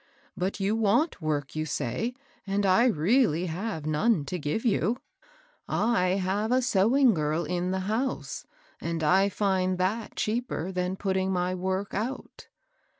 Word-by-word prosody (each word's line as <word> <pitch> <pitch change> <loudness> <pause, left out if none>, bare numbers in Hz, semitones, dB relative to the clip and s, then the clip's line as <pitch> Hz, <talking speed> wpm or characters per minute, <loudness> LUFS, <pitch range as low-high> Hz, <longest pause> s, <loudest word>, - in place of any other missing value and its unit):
But 190 +3 -2
you 200 +2 +1
want 225 - +2
work, 150 -3 -2
you 155 - -1
say, 225 - -2 0.3
and 200 +1 0
I 190 +5 +5
really 185 - +2
have 175 -1 -4
none 155 +2 +2
to 180 +5 -4
give 150 - -2
you. 220 +1 +2 0.7
I 190 -5 +2
have 200 +4 -1
a 255 0 +3
sewing 240 +3 +4
girl 155 0 -1
in 180 +2 -1
the 190 - 0
808 190 0 -4
MABEL 270 - +1
ROSS. - - -11 0.2
house, - - -26 0.4
and 165 -1 -2
I 190 +6 +4
find 190 -2 0
that 205 +5 -1
cheaper 215 -6 -2
then 180 0 -1
putting 190 -1 -1
n^ 180 -1 0
work 190 +2 -2
out.' 250 +6 -5
190 Hz, 160 wpm, -27 LUFS, 180-220 Hz, 0.7 s, I